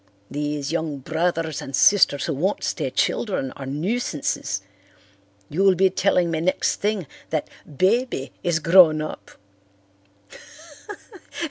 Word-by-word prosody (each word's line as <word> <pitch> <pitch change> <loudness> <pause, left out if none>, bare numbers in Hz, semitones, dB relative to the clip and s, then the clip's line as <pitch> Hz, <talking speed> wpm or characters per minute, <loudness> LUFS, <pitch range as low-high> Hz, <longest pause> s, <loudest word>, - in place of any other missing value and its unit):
These 145 0 -3
young 160 -3 -2
brothers 160 +2 -2
and 135 - -4
sisters 180 -7 +4
who 160 - -1
won't 180 +9 -1
stay - - -2
children 185 - -1
are 135 - -9
nuisances. 150 - -2 0.8
You'll 190 +4 +3
be 190 +1 +3
telling 180 -2 +1
me 160 -1 -1
next 185 +3 0
thing 205 -3 -1 0.2
that 155 -2 -2 0.3
'Baby' 205 - +1
is 175 -2 +1
grown 165 -1 +6
up." - - -8
165 Hz, 115 wpm, -23 LUFS, 150-190 Hz, 0.8 s, grown